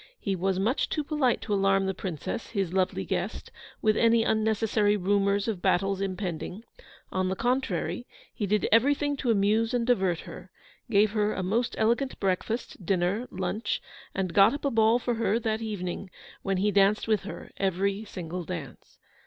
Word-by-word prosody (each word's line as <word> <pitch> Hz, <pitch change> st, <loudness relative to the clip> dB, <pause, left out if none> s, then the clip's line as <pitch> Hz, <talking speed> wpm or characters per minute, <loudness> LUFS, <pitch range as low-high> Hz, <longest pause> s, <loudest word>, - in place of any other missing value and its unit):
He 195 Hz, -2 st, -1 dB
was 190 Hz, +1 st, 0 dB
much 220 Hz, +8 st, +1 dB
too 305 Hz, -, -1 dB
polite 285 Hz, -5 st, +1 dB
to 210 Hz, -, -2 dB
alarm 195 Hz, -1 st, +3 dB
the 190 Hz, -, 0 dB
Princess, 180 Hz, +3 st, -5 dB
his 195 Hz, -5 st, -2 dB
lovely 185 Hz, -1 st, 0 dB
guest, -, -, -3 dB, 0.3 s
with 215 Hz, -1 st, +4 dB
any 230 Hz, 0 st, +4 dB
unnecessary 220 Hz, -1 st, +2 dB
rumours 200 Hz, +1 st, +1 dB
of 205 Hz, -6 st, -2 dB
battles 195 Hz, +2 st, +1 dB
impending; 185 Hz, +1 st, -4 dB, 0.5 s
on 185 Hz, 0 st, 0 dB
the 190 Hz, -, -1 dB
contrary, 245 Hz, +1 st, -1 dB, 0.3 s
he 205 Hz, -, -2 dB
did 210 Hz, +2 st, +1 dB
everything 285 Hz, +5 st, +3 dB
to 255 Hz, -, -2 dB
amuse 220 Hz, +3 st, +2 dB
and 235 Hz, -1 st, +1 dB
divert 190 Hz, -8 st, +1 dB
her; -, -, -10 dB, 0.4 s
gave 210 Hz, -1 st, +4 dB
her 210 Hz, -1 st, +1 dB
a 190 Hz, -, -2 dB
most 230 Hz, +6 st, 0 dB
elegant 235 Hz, +5 st, +1 dB
breakfast, 195 Hz, +3 st, -2 dB
dinner, 190 Hz, +6 st, 0 dB
lunch, 190 Hz, +4 st, -2 dB, 0.4 s
and 185 Hz, -3 st, -1 dB
got 200 Hz, +7 st, +6 dB
up 290 Hz, -, -6 dB
a 280 Hz, -, +2 dB
ball 225 Hz, +1 st, +4 dB
for 245 Hz, 0 st, -1 dB
her 230 Hz, -1 st, +1 dB
that 220 Hz, -1 st, -1 dB
evening, 195 Hz, -3 st, -4 dB, 0.3 s
when 195 Hz, -1 st, -1 dB
he 205 Hz, +3 st, +2 dB
danced 200 Hz, +2 st, +3 dB
with 215 Hz, -2 st, +2 dB
her 205 Hz, -, -8 dB
every 195 Hz, +2 st, 0 dB
single 180 Hz, -3 st, -6 dB
dance. 160 Hz, -6 st, -8 dB
205 Hz, 170 wpm, -28 LUFS, 190-225 Hz, 0.5 s, got